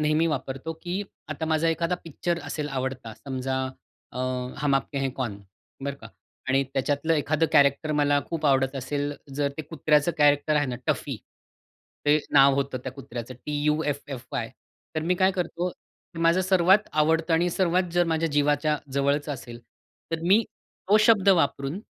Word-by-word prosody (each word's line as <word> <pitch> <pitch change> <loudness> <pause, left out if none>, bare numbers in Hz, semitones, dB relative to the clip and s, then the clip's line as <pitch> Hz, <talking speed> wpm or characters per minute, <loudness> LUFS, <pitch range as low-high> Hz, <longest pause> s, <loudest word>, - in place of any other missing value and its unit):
नेहमी 155 +2 +2
वापरतो 135 0 -3
की 180 +3 -2 0.3
आता 155 +1 -3
माझा 160 +1 +2
एखादा 170 +2 0
पिक्चर 170 +2 -2
असेल 145 +1 -4
आवडता, 130 -4 -4
समजा 130 0 -4 0.6
अ, - - -7 0.4
"हम 140 -1 +2
आपके 135 +1 -1
हैं 135 -1 0
कौन." 120 -6 -4 0.4
बरं 140 0 -2
का 115 - -9 0.4
आणि 135 +1 +3
त्याच्यातलं 145 +4 0
एखादं 155 +1 +1
कॅरेक्टर 145 +1 +4
मला 145 -1 +3
खूप 165 -2 -4
आवडत 135 -1 +2
असेल, 145 +2 -2 0.2
जर 145 0 +1
ते 155 - -4
कुत्र्याचं 150 +1 +1
कॅरेक्टर 145 +1 +4
आहे 145 -1 +2
ना 125 -1 -3
टफी. - - -1 0.9
ते 145 +1 +6 0.2
नाव 140 -1 +7
होतं 135 -1 -1
त्या 130 - -5
कुत्र्याचं 130 -2 -7
टी-यु-एफ-एफ-वाय. 145 -4 -2 0.4
तर 155 - 0
मी 175 +3 +1
काय 190 0 +5
करतो 175 -1 -2
की 170 - -17
माझं 165 +2 +4
सर्वात 190 +2 +4
आवडतं 160 +2 +2
आणि 170 +2 +2
सर्वात 180 0 +1
जर 175 0 +3
माझ्या 165 +1 +1
जीवाच्या 145 +1 +2 0.2
जवळचं 140 +2 +1
असेल, 120 -3 -8 0.5
तर 165 - -1
मी 195 +6 +5 0.5
तो 205 - +6
शब्द 205 -4 +5
वापरून, 150 -3 +2
150 Hz, 160 wpm, -26 LUFS, 135-165 Hz, 0.9 s, नाव